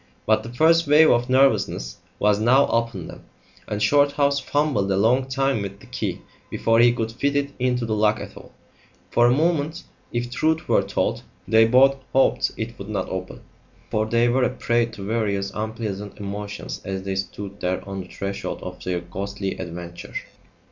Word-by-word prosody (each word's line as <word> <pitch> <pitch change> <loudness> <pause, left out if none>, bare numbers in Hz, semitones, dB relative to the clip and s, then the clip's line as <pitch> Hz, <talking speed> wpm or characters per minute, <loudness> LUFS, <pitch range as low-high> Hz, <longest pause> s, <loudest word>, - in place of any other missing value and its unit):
But 110 0 +3
the 115 - -8
first 160 +5 +4
wave 155 +2 +6
of 120 +1 +1
nervousness 130 - +2 0.2
was 105 0 +2
now 130 +5 +5
upon 115 -7 -1
them, - - -11 0.4
and 105 - -3
Shorthouse 140 +2 +3
fumbled 140 -8 0
a 95 - +2
long 125 +6 +3
time 135 -3 0
with 100 0 -6
the - - -15
key - - -4 0.3
before 115 0 +2
he 120 0 +7
could 115 -1 -2
fit 140 +4 -1
it 140 0 0
into 125 -1 0
the 110 - -2
lock 105 0 +2
at - - -8
all. - - -13 0.6
For 120 0 +4
a - - +4
moment, 155 +2 0 0.3
if 120 0 -3
truth 160 +4 0
were - - +4
told, - - -1 0.3
they 110 +1 +6
both 135 +3 +5 0.2
hoped 135 - +3
it 115 +1 -5
would 100 +1 -8
not 100 -3 -2
open, 95 0 -6 0.5
for 110 0 0
they 115 +1 +3
were 125 +2 +2
a - - +3
prey 120 0 0
to 115 -4 -9
various 100 -3 -1
unpleasant 105 -2 -5
emotions 100 0 -6
as 95 0 -4
they 95 0 -3
stood 100 +1 -5
there 90 +2 -2
on 95 -1 -4
the 90 - -10
threshold 100 +1 -5
of - - -8
their 90 -1 -2
ghostly 95 +3 -4
adventure. 85 -1 -8
115 Hz, 180 wpm, -23 LUFS, 100-130 Hz, 0.6 s, he